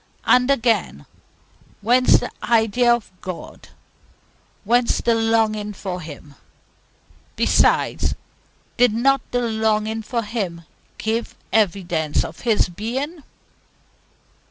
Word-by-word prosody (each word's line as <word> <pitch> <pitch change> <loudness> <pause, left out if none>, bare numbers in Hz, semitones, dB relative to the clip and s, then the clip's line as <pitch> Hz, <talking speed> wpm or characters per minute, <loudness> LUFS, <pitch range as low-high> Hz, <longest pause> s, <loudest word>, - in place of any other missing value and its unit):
And 250 +1 +4
again, 225 - +1 0.8
whence 245 +4 +5
the - - -5
idea 235 +1 +3
of 235 -5 0
God, 185 -2 -8 0.9
whence 240 +3 +2
the 235 - +2
longing 220 -2 +1
for 185 -2 -5
Him? 150 -2 -11 1.0
Besides, - - +2 0.6
did 245 -3 +4
not 270 +4 +2
the 245 - 0
longing 220 -1 0
for 230 +2 -3
Him 195 -6 -4 0.3
give 225 +2 -2 0.2
evidence 175 -7 +1
of 160 - -9
His 225 -4 +2
being? 255 - -4
220 Hz, 100 wpm, -21 LUFS, 200-240 Hz, 1.0 s, whence